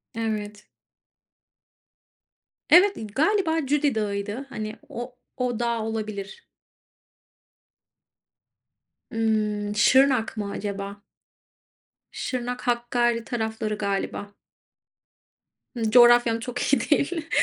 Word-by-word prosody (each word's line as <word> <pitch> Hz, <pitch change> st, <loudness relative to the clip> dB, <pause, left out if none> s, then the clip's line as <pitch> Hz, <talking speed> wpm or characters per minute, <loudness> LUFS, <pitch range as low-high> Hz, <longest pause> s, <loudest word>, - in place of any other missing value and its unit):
Evet. 210 Hz, -2 st, -4 dB, 2.0 s
Evet, 390 Hz, +3 st, +6 dB, 0.2 s
galiba 325 Hz, -1 st, +2 dB
Cudi 285 Hz, -1 st, +1 dB
Dağı'ydı, 210 Hz, +4 st, -3 dB
hani, 215 Hz, -3 st, -5 dB
o 245 Hz, +1 st, -7 dB, 0.2 s
o 245 Hz, -2 st, -1 dB
dağ 235 Hz, -1 st, 0 dB
olabilir. 215 Hz, -3 st, -5 dB, 2.7 s
Hıı, 215 Hz, -2 st, 0 dB
Şırnak 255 Hz, +1 st, +4 dB
mı 205 Hz, -1 st, -3 dB
acaba? 200 Hz, 0 st, -5 dB, 1.1 s
Şırnak, 250 Hz, -1 st, -4 dB
Hakkari 240 Hz, -1 st, +1 dB
tarafları 220 Hz, -3 st, -3 dB
galiba. 200 Hz, 0 st, -3 dB, 1.4 s
Hıı, 225 Hz, -2 st, -1 dB
coğrafyam 240 Hz, -1 st, +6 dB
çok 245 Hz, +1 st, -5 dB
iyi 280 Hz, -, +2 dB
değil 325 Hz, +2 st, 0 dB
230 Hz, 80 wpm, -25 LUFS, 210-250 Hz, 2.7 s, Evet